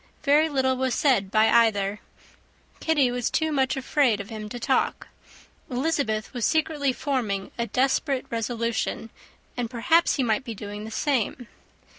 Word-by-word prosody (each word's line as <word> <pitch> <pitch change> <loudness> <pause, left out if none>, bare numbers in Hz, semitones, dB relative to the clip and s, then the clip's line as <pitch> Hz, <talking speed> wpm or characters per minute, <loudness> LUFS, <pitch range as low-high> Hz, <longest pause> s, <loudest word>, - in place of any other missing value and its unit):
Very 300 +2 +4
little 260 -2 +1
was 260 -1 0
said 240 -10 +2
by 215 +2 +4
either; 210 -3 +3 0.8
Kitty 290 -6 +2
was 245 -1 -1
too 315 0 0
much 270 -1 +1
afraid 265 -4 +2
of 200 +3 -7
him 215 -1 -6
to 245 - -6
talk; 260 +2 0 0.6
Elizabeth 250 -5 -1
was 245 -3 -4
secretly 305 -2 +1
forming 240 -8 -2
a 235 0 -2
desperate 265 +1 0
resolution; 230 -1 -2 0.4
and, 245 -2 -3
perhaps, 320 +9 +2
he 270 - 0
might 225 +1 +1
be 230 -4 -6
doing 205 +1 -7
the - - -7
same. 245 -1 -1
245 Hz, 150 wpm, -25 LUFS, 220-275 Hz, 0.8 s, Very